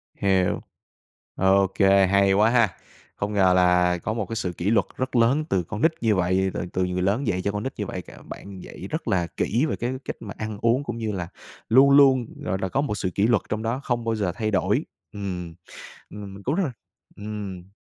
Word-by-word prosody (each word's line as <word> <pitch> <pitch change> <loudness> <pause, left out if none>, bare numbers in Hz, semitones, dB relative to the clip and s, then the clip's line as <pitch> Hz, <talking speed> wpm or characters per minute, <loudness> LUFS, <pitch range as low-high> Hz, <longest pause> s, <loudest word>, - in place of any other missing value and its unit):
Hiểu. 95 -2 +1 0.7
Ô 95 0 +4
kê, 95 0 +5
hay 100 +1 +3
quá 105 +3 +4
ha. 115 -3 +4 0.5
Không 100 +1 -3
ngờ 95 -3 +4
là 90 -1 +3
có 100 +5 -3
một 110 -2 -2
cái 115 - -6
sự 90 -5 -2
kỷ 90 +4 -1
luật 115 - +3
rất 130 0 -3
lớn 130 +7 +3
từ 90 -2 +1
con 105 +6 -6
nít 160 - +4
như 110 -3 +2
vậy, 95 +1 +1
rồi - - -7 0.2
từ 95 - 0
từ - - +2
người 90 0 -2
lớn 105 +8 0
dạy 95 -3 0
cho 100 +2 -1
con 105 +1 -4
nít 135 - -4
như 105 - -2
vậy, 90 - -5
c - - -27 0.2
bạn 100 -2 -9
dạy - - -9
rất - - -4
là 90 -3 +1
kỹ 120 +9 +1
về - - -1
cái 120 +2 -3
cách - - -4
mà 105 - -8
ăn 110 -1 -5
uống 120 +4 +2
cũng 130 - -5
như 110 -2 -2
là 90 -4 -4 0.4
luôn 135 +4 +6
luôn, 135 -3 +6 0.2
gọi 95 - -1
là, 95 - -1
có 135 +9 0
một 125 -8 -2
sự 95 - -1
kỷ 100 +2 +3
luật 115 -2 +3
trong 110 0 -2
đó 115 +4 -1
không 120 -3 -1
bao 115 -1 0
giờ 100 -5 -1
thay 110 -2 -2
đổi. 95 - +1 0.3
Ừm, 90 -4 -5 0.6
ừm, 100 -1 -8
mình 100 - -11
cũng 135 +9 -1
rất 195 - +1
là 140 - -3 0.4
ừm. 100 -3 -7
100 Hz, 240 wpm, -24 LUFS, 95-115 Hz, 0.7 s, luôn